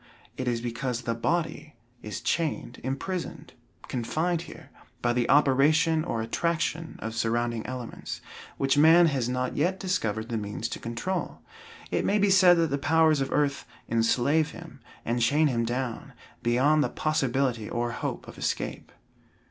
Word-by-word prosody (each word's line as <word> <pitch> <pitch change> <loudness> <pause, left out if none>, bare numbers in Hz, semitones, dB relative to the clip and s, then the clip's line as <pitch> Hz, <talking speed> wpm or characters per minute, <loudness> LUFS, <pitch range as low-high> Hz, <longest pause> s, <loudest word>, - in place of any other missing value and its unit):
It 130 - -4
is 120 -1 0
because 120 +1 -3
the 115 - -1
body 155 +4 -2 0.3
is 105 -2 -6
chained, 155 -6 -2
imprisoned, 160 +3 -4 0.3
confined 160 +8 -1
here, 165 -2 -12 0.3
by 120 0 +2
the 120 -1 0
operation 150 +4 +4
or 115 -9 -2
attraction 165 +5 -1
of 110 0 -4
surrounding 115 0 -1
elements, 125 -2 -6 0.4
which 135 +1 +2
man 165 +3 +7
has 135 -6 0
not 125 0 -2
yet 180 +6 +1
discovered 115 - -1
the 115 -2 -1
means 105 +2 -4
to - - -5
control. 145 +11 -4 0.5
It - - +1
may 205 - +2
be 205 -1 +3
said 180 -2 +7
that 165 -3 +1
the 140 - 0
powers 155 0 +3
of 135 - -2
earth 145 -1 0 0.2
enslave 120 +7 +2
him, 165 -6 -11 0.3
and 120 +1 0
chain 145 +7 +3
him 120 -5 +1
down, 120 0 -3 0.3
beyond 140 +6 +3
the - - 0
possibility 135 -7 0
or 120 0 -1
hope - - -4
of - - -11
escape. - - -3
135 Hz, 155 wpm, -27 LUFS, 120-160 Hz, 0.5 s, man